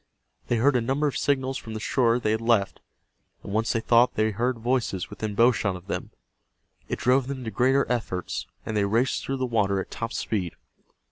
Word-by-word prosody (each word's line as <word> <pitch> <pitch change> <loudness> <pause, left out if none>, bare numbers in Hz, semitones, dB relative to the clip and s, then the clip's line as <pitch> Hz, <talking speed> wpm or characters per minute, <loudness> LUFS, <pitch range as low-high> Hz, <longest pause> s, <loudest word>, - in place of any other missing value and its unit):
They 120 - +1
heard 130 +4 +3
a 125 - +3
number 135 +6 0
of 145 - 0
signals 135 -2 0
from 110 -1 -8
the - - -3
shore 120 +1 +2
they 110 - 0
had 110 +1 0
left, 115 -4 +1 0.6
and 100 - -6
once 110 +1 +1
they 115 - +1
thought 120 +2 +4
they 110 0 +2
heard 120 +4 -1
voices 115 -6 -1
within 105 0 -4
bow 120 +4 +6
shot 100 -5 -1
of 90 0 -10
them. - - -4 0.8
It - - -2
drove 130 +1 +2
them 135 -2 -5
to 110 - -4
greater 135 +4 +3
efforts, 105 -7 -3 0.2
and 110 - -3
they 105 - +2
raced 115 +6 +1
through 135 - -2
the 130 - -1
water 105 -5 +1
at - - -6
top 115 0 -4
speed. 95 -6 -2
115 Hz, 210 wpm, -26 LUFS, 110-130 Hz, 0.8 s, bow